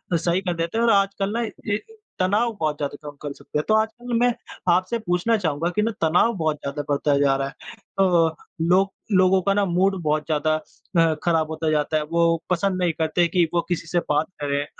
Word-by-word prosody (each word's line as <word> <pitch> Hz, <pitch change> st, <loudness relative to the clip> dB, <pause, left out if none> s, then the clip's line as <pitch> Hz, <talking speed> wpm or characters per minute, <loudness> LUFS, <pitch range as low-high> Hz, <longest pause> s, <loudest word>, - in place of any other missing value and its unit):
सही 170 Hz, +2 st, +1 dB
कर 180 Hz, -2 st, -2 dB
देते 165 Hz, +5 st, -3 dB
हैं 230 Hz, -, +2 dB
और 230 Hz, -, +4 dB
आजकल 195 Hz, -1 st, +1 dB
ना 235 Hz, -, 0 dB
ये 210 Hz, -2 st, -3 dB, 0.4 s
तनाव 210 Hz, +6 st, +2 dB
बहुत 155 Hz, -2 st, -1 dB
ज़्यादा 145 Hz, -1 st, -4 dB
कम 145 Hz, -, -13 dB
कर 145 Hz, -1 st, -5 dB
सकते 150 Hz, -, -6 dB
हैं। -, -, -1 dB
तो 215 Hz, -, +3 dB
आजकल 225 Hz, +3 st, -1 dB
मैं 245 Hz, 0 st, +3 dB, 0.4 s
आपसे 185 Hz, +6 st, +1 dB
पूछना 215 Hz, +3 st, +1 dB
चाहूँगा 165 Hz, -3 st, -1 dB
कि 210 Hz, -, +2 dB
ना 225 Hz, +2 st, +1 dB
तनाव 175 Hz, +8 st, +3 dB
बहुत 155 Hz, -2 st, 0 dB
ज़्यादा 140 Hz, +1 st, -4 dB
बढ़ता 145 Hz, 0 st, +2 dB
जा 140 Hz, -1 st, +3 dB
रहा 135 Hz, 0 st, -1 dB
है। 140 Hz, -, -9 dB, 0.5 s
अ, 170 Hz, -4 st, +3 dB, 0.3 s
लोग 185 Hz, +4 st, +3 dB, 0.3 s
लोगों 185 Hz, 0 st, +4 dB
का 200 Hz, +2 st, +1 dB
ना 205 Hz, 0 st, +2 dB
मूड 190 Hz, +1 st, +1 dB
बहुत 150 Hz, -1 st, 0 dB
ज़्यादा 155 Hz, 0 st, +1 dB
अ, 165 Hz, +1 st, -1 dB
ख़राब 165 Hz, -2 st, +1 dB
होता 160 Hz, 0 st, -1 dB
जाता 155 Hz, +1 st, +1 dB
है। 155 Hz, -, -1 dB
वो 170 Hz, -1 st, +2 dB
पसंद 185 Hz, +1 st, 0 dB
नहीं 175 Hz, -2 st, +2 dB
करते 160 Hz, +2 st, +2 dB
कि 175 Hz, 0 st, +2 dB
वो 170 Hz, -, +2 dB
किसी 175 Hz, -2 st, -2 dB
से 175 Hz, +1 st, +1 dB
बात 150 Hz, +1 st, +2 dB
करें 145 Hz, 0 st, -1 dB
170 Hz, 215 wpm, -23 LUFS, 155-195 Hz, 0.5 s, और